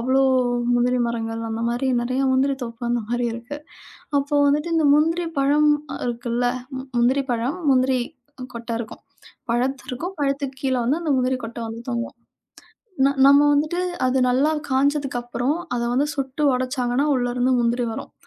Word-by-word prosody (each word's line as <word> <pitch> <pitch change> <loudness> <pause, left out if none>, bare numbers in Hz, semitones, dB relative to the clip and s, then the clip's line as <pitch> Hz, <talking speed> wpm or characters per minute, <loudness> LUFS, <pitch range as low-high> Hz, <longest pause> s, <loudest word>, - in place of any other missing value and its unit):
அவ்வளோ 260 +3 +2 0.5
முந்திரி 250 +1 +2
மரங்கள், 225 -1 -3
அந்த 225 +1 -3
மாதிரி 245 +3 -1
நெறைய 255 +3 -1
முந்திரி 270 +1 +2
தோப்பு, 230 0 -7
அந்த 240 - +1
மாதிரி 240 +1 -1
இருக்கு. 240 +5 -7 0.6
அப்போ 285 +1 -2
வந்துட்டு, 300 +4 +1
இந்த 315 - +3
முந்திரி 330 +3 +2
பழம் 295 +2 +3 0.3
அ, - - -4
இருக்குல்ல, 240 0 -1 0.3
ம், 260 - -7
முந்திரி 260 +3 +2
பழம், 245 +9 -2
முந்திரி 260 0 +3 0.6
கொட்ட 235 0 -7
இருக்கும். 220 - -9 0.5
பழத்திருக்கும், 260 +7 -2
பழத்துக்குக் 275 -2 -2
கீழ 260 -1 +1
வந்து 285 +7 +1
அந்த 305 -3 0
முந்திரி 255 0 0
கொட்ட 230 +1 -7
வந்து 230 +1 -7
தொங்கும். 235 0 -3 0.9
ந - - +5 0.2
நம்ம 280 +1 +7
வந்துட்டு, 310 +5 0 0.3
அது 260 +1 +1
நல்லா 280 +5 +2 0.2
காஞ்சதுக்கப்புறம், 265 -1 0 0.2
அத 235 - -1
வந்து 285 +4 +1
சுட்டு 270 +2 -2
ஒடச்சாங்கன்னா 255 +2 0
உள்ள 245 -1 0
இருந்து 255 +1 +2
முந்திரி 235 +1 +1
வரும். - - -7
255 Hz, 155 wpm, -22 LUFS, 240-280 Hz, 0.9 s, நம்ம